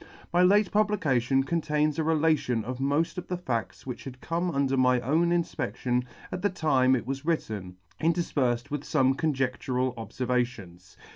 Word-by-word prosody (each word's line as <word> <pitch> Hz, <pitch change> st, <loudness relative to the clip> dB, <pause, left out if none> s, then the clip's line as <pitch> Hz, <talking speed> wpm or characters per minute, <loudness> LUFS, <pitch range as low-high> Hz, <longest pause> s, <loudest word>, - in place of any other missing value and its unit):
My 175 Hz, -, +4 dB
late 200 Hz, +2 st, +4 dB
publication 140 Hz, -, +2 dB
contains 150 Hz, -1 st, 0 dB
a -, -, +2 dB
relation 155 Hz, -8 st, +1 dB
of 125 Hz, +1 st, -5 dB
moft 145 Hz, +6 st, 0 dB
of 180 Hz, -, -9 dB
the 180 Hz, -, -2 dB
fadts 125 Hz, -10 st, -4 dB
which 125 Hz, -2 st, -6 dB
had 130 Hz, -1 st, -8 dB
come 170 Hz, +5 st, -1 dB
under 140 Hz, -4 st, +1 dB
my 125 Hz, -1 st, +4 dB
own 160 Hz, +8 st, +2 dB
infpedtion 125 Hz, -7 st, -1 dB, 0.3 s
at 180 Hz, -, -4 dB
the 205 Hz, -, +2 dB
time 135 Hz, -8 st, +3 dB
it 120 Hz, -, -3 dB
was 135 Hz, +2 st, -4 dB
written, 110 Hz, -, -2 dB, 0.3 s
interfperfed 140 Hz, -6 st, 0 dB
with 145 Hz, -2 st, -2 dB
fome 135 Hz, -3 st, +2 dB
conjedtural 130 Hz, -4 st, -1 dB
obfervations. 115 Hz, -6 st, -3 dB
135 Hz, 155 wpm, -27 LUFS, 125-165 Hz, 0.3 s, My